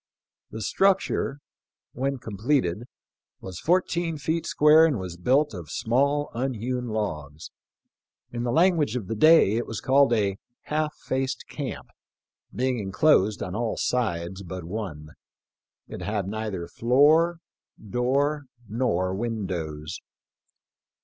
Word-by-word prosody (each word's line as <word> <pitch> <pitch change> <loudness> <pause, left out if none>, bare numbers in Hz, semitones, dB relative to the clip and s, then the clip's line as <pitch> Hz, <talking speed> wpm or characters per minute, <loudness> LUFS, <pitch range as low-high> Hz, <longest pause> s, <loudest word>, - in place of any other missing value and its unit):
The 110 0 -6
structure, 185 - +1 0.5
when 135 +2 -2
completed, 110 - -1 0.5
was 95 -2 -8
fourteen 175 -2 0
feet 160 +3 -2
square, 150 +2 +6
and 155 -6 +3
was 90 -3 -6
built 130 - +2
of 85 -6 -8
small 140 +5 0
unhewn 125 0 -2
logs. 75 -10 -4 0.8
In, 120 - -4
the 120 0 -1
language 165 - +3
of 120 -6 -3
the 115 - -4
day, 155 -5 +6
it 120 - -2
was 110 - -4
called 135 -1 +4
a 100 -3 0 0.2
"half 150 0 -2
faced 130 +1 -3
camp," - - -6 0.6
being 125 -1 -1
enclosed 105 +1 +2
on 90 - -5
all 115 +1 -2
sides 95 -6 -1
but 90 -1 -7
one. 85 -5 -6 0.8
It - - -8
had 100 0 -2
neither 105 -4 -4
floor, 150 - +3 0.4
door, 135 +7 0 0.2
nor 95 -6 0
windows. 90 -8 -4
120 Hz, 120 wpm, -25 LUFS, 95-140 Hz, 0.8 s, square